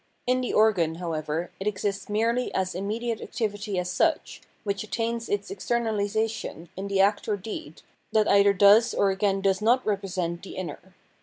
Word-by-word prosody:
In 255 Hz, +1 st, +2 dB
the 250 Hz, -, -2 dB
organ, 190 Hz, -7 st, +3 dB
however, 165 Hz, -1 st, -3 dB
it 195 Hz, -, -3 dB
exists 200 Hz, 0 st, -2 dB
merely 230 Hz, +4 st, +1 dB
as 185 Hz, -1 st, 0 dB
immediate 220 Hz, +5 st, -3 dB
activity 205 Hz, -3 st, -3 dB
as 180 Hz, 0 st, -1 dB
such, -, -, 0 dB, 0.2 s
which 200 Hz, -1 st, -2 dB
attains 230 Hz, +1 st, -3 dB
its 200 Hz, -1 st, -2 dB
externalisation 220 Hz, -4 st, -2 dB
in 195 Hz, +1 st, -5 dB
the 200 Hz, -1 st, 0 dB
act 200 Hz, +2 st, +3 dB
or 210 Hz, -2 st, 0 dB
deed, 185 Hz, -6 st, -8 dB, 0.3 s
that 215 Hz, -1 st, +3 dB
either 200 Hz, 0 st, +6 dB
does 205 Hz, +4 st, +6 dB
or 200 Hz, -1 st, +3 dB
again 195 Hz, 0 st, 0 dB
does 195 Hz, 0 st, +1 dB
not 245 Hz, +4 st, +3 dB
represent 185 Hz, -4 st, -2 dB
the 195 Hz, -, -9 dB
inner. 185 Hz, 0 st, -7 dB
200 Hz, 165 wpm, -26 LUFS, 190-220 Hz, 0.3 s, either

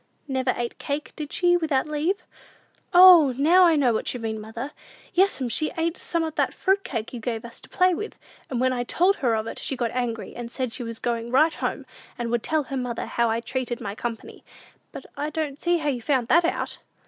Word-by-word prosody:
"Never 260 Hz, -2 st, 0 dB
ate 240 Hz, 0 st, -4 dB
cake, 290 Hz, +1 st, -4 dB
did 300 Hz, -1 st, -6 dB
she, 350 Hz, -1 st, +3 dB
without 315 Hz, -4 st, +1 dB
leave?" 305 Hz, +6 st, -1 dB, 0.7 s
"O, 350 Hz, -7 st, +8 dB
now 345 Hz, +6 st, +6 dB
I 330 Hz, -, +4 dB
know 265 Hz, -5 st, +3 dB
what 220 Hz, -, 0 dB
you -, -, -4 dB
mean, 220 Hz, -1 st, -4 dB
mother! 230 Hz, +6 st, -6 dB, 0.4 s
Yes'm, 360 Hz, -8 st, +2 dB
she 305 Hz, +7 st, 0 dB
ate 330 Hz, +1 st, 0 dB
some 335 Hz, -2 st, -2 dB
of 320 Hz, -1 st, -3 dB
that -, -, 0 dB
fruit 390 Hz, +1 st, +1 dB
cake 230 Hz, -3 st, -4 dB
you 245 Hz, -, -5 dB
gave 225 Hz, 0 st, -4 dB
us 235 Hz, -, -10 dB
to -, -, -16 dB
play 365 Hz, 0 st, +3 dB
with; 425 Hz, +6 st, -5 dB, 0.3 s
and 250 Hz, -, -2 dB
when 255 Hz, 0 st, +2 dB
I 245 Hz, -1 st, -1 dB
told 365 Hz, +10 st, +2 dB
her 240 Hz, -4 st, +1 dB
of 220 Hz, 0 st, -2 dB
it, -, -, -6 dB
she 270 Hz, -, -3 dB
got 240 Hz, -2 st, -1 dB
angry, 240 Hz, -3 st, -3 dB
and 240 Hz, -1 st, -6 dB
said 255 Hz, -2 st, -3 dB
she 255 Hz, -, -6 dB
was 230 Hz, -1 st, -5 dB
going 235 Hz, 0 st, -2 dB
right 305 Hz, +6 st, +4 dB
home, -, -, -3 dB, 0.3 s
and 235 Hz, -2 st, -3 dB
would 240 Hz, -1 st, +1 dB
tell 310 Hz, +3 st, 0 dB
her 270 Hz, 0 st, -5 dB
mother 245 Hz, -2 st, -3 dB
how 235 Hz, -1 st, 0 dB
I 225 Hz, +1 st, 0 dB
treated 245 Hz, 0 st, -3 dB
my 200 Hz, -, -5 dB
company; 230 Hz, +1 st, -6 dB, 0.5 s
but -, -, -9 dB
I 295 Hz, -, -2 dB
don't 305 Hz, -2 st, -4 dB
see 345 Hz, 0 st, +2 dB
how 300 Hz, -3 st, -1 dB
you 250 Hz, -4 st, -2 dB
found 255 Hz, -2 st, 0 dB
that 340 Hz, +1 st, +5 dB
out!" 345 Hz, -, -2 dB
260 Hz, 230 wpm, -25 LUFS, 235-320 Hz, 0.7 s, O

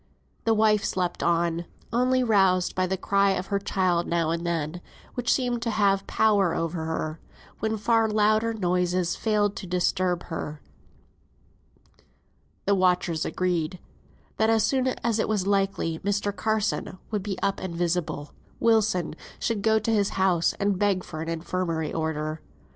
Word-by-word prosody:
The 225 Hz, -1 st, +3 dB
wife 215 Hz, -1 st, +3 dB
slept 180 Hz, -2 st, -1 dB
on, 170 Hz, 0 st, +1 dB, 0.3 s
only 255 Hz, +2 st, +3 dB
roused 190 Hz, -5 st, +3 dB
by 185 Hz, -, +1 dB
a 190 Hz, +1 st, -1 dB
cry 200 Hz, +1 st, +2 dB
of 185 Hz, -, -2 dB
her 200 Hz, -, +2 dB
child 185 Hz, -3 st, 0 dB
now 170 Hz, -2 st, +1 dB
and 170 Hz, 0 st, -2 dB
then, 165 Hz, 0 st, -2 dB, 0.3 s
which 245 Hz, -1 st, 0 dB
seemed 245 Hz, -3 st, +1 dB
to 235 Hz, -, -1 dB
have 200 Hz, -3 st, +2 dB
power 200 Hz, -5 st, +3 dB
over 165 Hz, -1 st, -2 dB
her, 160 Hz, 0 st, -3 dB, 0.4 s
when 220 Hz, 0 st, -1 dB
far 225 Hz, +1 st, +2 dB
louder 215 Hz, +1 st, +2 dB
noises 180 Hz, -3 st, 0 dB
failed 210 Hz, -2 st, +1 dB
to 190 Hz, -, -6 dB
disturb 180 Hz, 0 st, 0 dB
her. 155 Hz, -2 st, -5 dB, 2.1 s
The 200 Hz, -, +3 dB
watchers 180 Hz, -3 st, +2 dB
agreed, 180 Hz, -1 st, -1 dB, 0.6 s
that 220 Hz, 0 st, +3 dB
as 225 Hz, -2 st, +3 dB
soon 260 Hz, +3 st, +1 dB
as 235 Hz, -3 st, -1 dB
it -, -, 0 dB
was 205 Hz, -4 st, 0 dB
likely 195 Hz, -5 st, 0 dB
Mr. 205 Hz, 0 st, -1 dB
Carson 215 Hz, -3 st, -1 dB
would 210 Hz, -2 st, -1 dB
be 195 Hz, -1 st, -4 dB
up 195 Hz, 0 st, +1 dB
and 185 Hz, -3 st, -5 dB
visible, 170 Hz, -4 st, -2 dB, 0.3 s
Wilson 220 Hz, -7 st, +2 dB, 0.2 s
should 225 Hz, -4 st, -1 dB
go 220 Hz, +1 st, +3 dB
to 220 Hz, +1 st, 0 dB
his 205 Hz, -2 st, +2 dB
house, 180 Hz, -3 st, +3 dB
and 200 Hz, -2 st, -1 dB
beg 200 Hz, -3 st, +2 dB
for 155 Hz, -, -7 dB
an 165 Hz, -, -4 dB
Infirmary 165 Hz, -1 st, -2 dB
order. 155 Hz, -1 st, -2 dB
190 Hz, 155 wpm, -26 LUFS, 170-215 Hz, 2.1 s, The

